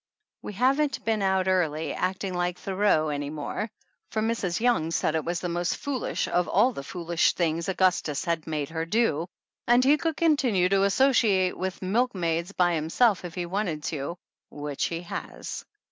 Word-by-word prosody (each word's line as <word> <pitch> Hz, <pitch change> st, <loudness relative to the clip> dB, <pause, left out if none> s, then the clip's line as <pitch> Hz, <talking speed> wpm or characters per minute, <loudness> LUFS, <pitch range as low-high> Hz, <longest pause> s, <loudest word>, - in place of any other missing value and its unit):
We -, -, -7 dB
haven't 270 Hz, +3 st, +1 dB
been 220 Hz, -2 st, +1 dB
out 190 Hz, -1 st, +1 dB
early 160 Hz, -4 st, +1 dB
acting 185 Hz, +1 st, -2 dB
like 175 Hz, 0 st, -1 dB
Thoreau 190 Hz, -5 st, +1 dB
any 145 Hz, -1 st, -3 dB
more, 155 Hz, +8 st, -4 dB, 0.4 s
for 220 Hz, -, -2 dB
Mrs. 215 Hz, -5 st, -1 dB
Young 220 Hz, -10 st, +2 dB
said 165 Hz, -1 st, 0 dB
it 160 Hz, -1 st, 0 dB
was 170 Hz, 0 st, -2 dB
the 180 Hz, -, -2 dB
most 175 Hz, +1 st, -1 dB
foolish 280 Hz, -4 st, -2 dB
of 180 Hz, 0 st, +1 dB
all 255 Hz, -, +3 dB
the 140 Hz, -, -5 dB
foolish 170 Hz, +2 st, 0 dB
things 170 Hz, 0 st, -1 dB
Augus 185 Hz, -1 st, +3 dB
tus 150 Hz, +1 st, -3 dB
had 165 Hz, -2 st, -1 dB
made 150 Hz, -3 st, -2 dB
her 160 Hz, 0 st, -3 dB
do, 175 Hz, -6 st, +1 dB, 0.4 s
and 240 Hz, +1 st, +5 dB
he 285 Hz, +3 st, +5 dB
could 325 Hz, -1 st, -2 dB
continue 255 Hz, -, +3 dB
to 195 Hz, 0 st, +3 dB
associate 200 Hz, -5 st, +3 dB
with 190 Hz, +1 st, -4 dB
milkmaids 185 Hz, -5 st, 0 dB
by 180 Hz, -3 st, +2 dB
himself 170 Hz, +7 st, +2 dB
if 175 Hz, -2 st, -7 dB
he 180 Hz, -, -2 dB
wanted 175 Hz, -4 st, -2 dB
to, 155 Hz, +2 st, -3 dB, 0.3 s
which 145 Hz, -1 st, -3 dB
he 165 Hz, 0 st, -3 dB
has. 175 Hz, -, -6 dB
180 Hz, 175 wpm, -26 LUFS, 165-215 Hz, 0.4 s, and